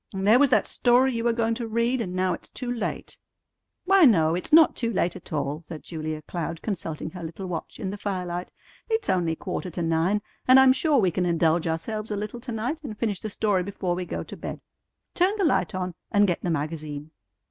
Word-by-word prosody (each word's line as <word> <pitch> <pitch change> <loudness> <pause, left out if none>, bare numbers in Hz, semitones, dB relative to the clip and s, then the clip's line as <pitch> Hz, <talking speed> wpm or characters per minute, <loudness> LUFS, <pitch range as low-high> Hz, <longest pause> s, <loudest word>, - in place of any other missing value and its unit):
And 190 0 -2
there 225 +4 +7
was 285 -1 +5
that 220 -5 +3
story 250 +2 +3
you 230 -1 -2
were 235 - +3
going 230 0 0
to 230 0 -4
read, 235 +3 +1
and 185 -4 -4
now 185 0 +1
it's - - -8
too 250 -1 -5
late!" 235 - -4 0.7
"Why, 390 0 +5
no; 165 - +5
it's 180 - -3
not 320 +1 +7
too 230 -2 -1
late 180 -4 0
at - - -11
all," 145 0 -2
said 160 -3 -8
Julia 155 -2 -5
Cloud, 165 -1 -5
consulting 165 -6 -4
her 180 - -8
little 170 +4 -6
watch 175 -3 -5
in 190 -4 -3
the 205 - -6
firelight. 180 -3 -3 0.4
"It's 445 -1 +1
only 170 -3 +1
quarter 180 +2 -4
to 175 0 -4
nine, 165 +6 +1 0.2
and 255 +1 +8
I'm 265 -1 +7
sure 290 +2 +2
we 190 -7 +3
can 180 +2 0
indulge 165 -1 +2
ourselves 215 +7 -3
a 210 - -2
little 210 +3 -5
to 245 +1 -7
night, 245 +9 -3
and 220 -7 -6
finish 210 -5 -1
the 215 - -5
story 205 -2 +1
before 190 -1 -2
we 180 +1 -3
go - - -4
to - - -9
bed. - - -6 0.5
Turn 370 +4 +2
the 395 - +2
light 190 - +1
on, 185 -1 -3 0.2
and 205 -1 +4
get 175 -4 -1
the 180 - -2
magazine." 155 -1 -4
190 Hz, 225 wpm, -25 LUFS, 170-235 Hz, 0.7 s, and